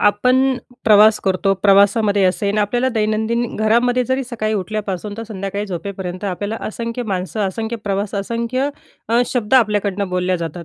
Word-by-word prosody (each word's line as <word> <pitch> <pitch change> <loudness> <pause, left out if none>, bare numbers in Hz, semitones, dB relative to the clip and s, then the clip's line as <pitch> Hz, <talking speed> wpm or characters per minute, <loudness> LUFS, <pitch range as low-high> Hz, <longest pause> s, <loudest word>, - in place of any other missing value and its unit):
आपण 255 +6 +3 0.3
प्रवास 215 0 +6
करतो, 195 +1 +2
प्रवासामध्ये 200 0 +4
असेल 200 +3 +1
आपल्याला 240 +5 +1
दैनंदिन 220 +2 0
घरामध्ये 240 +3 +2
जरी 260 +1 0
सकाळी 220 -3 -2
उठल्यापासून 205 0 -3
ते 230 - -4
संध्याकाळी 200 0 -4
झोपेपर्यंत 185 0 -5
आपल्याला 205 +3 -3
असंख्य 230 +2 -4
माणसं, 195 -1 -3
असंख्य 220 +4 -4
प्रवास, 200 0 -2
असंख्य 235 +6 -1 0.4
अ, 235 +2 +3
शब्द 240 -1 -1
आपल्याकडनं 205 -4 +2
बोलल्या 180 0 0
जातात. 170 0 -6
210 Hz, 140 wpm, -19 LUFS, 195-230 Hz, 0.4 s, प्रवास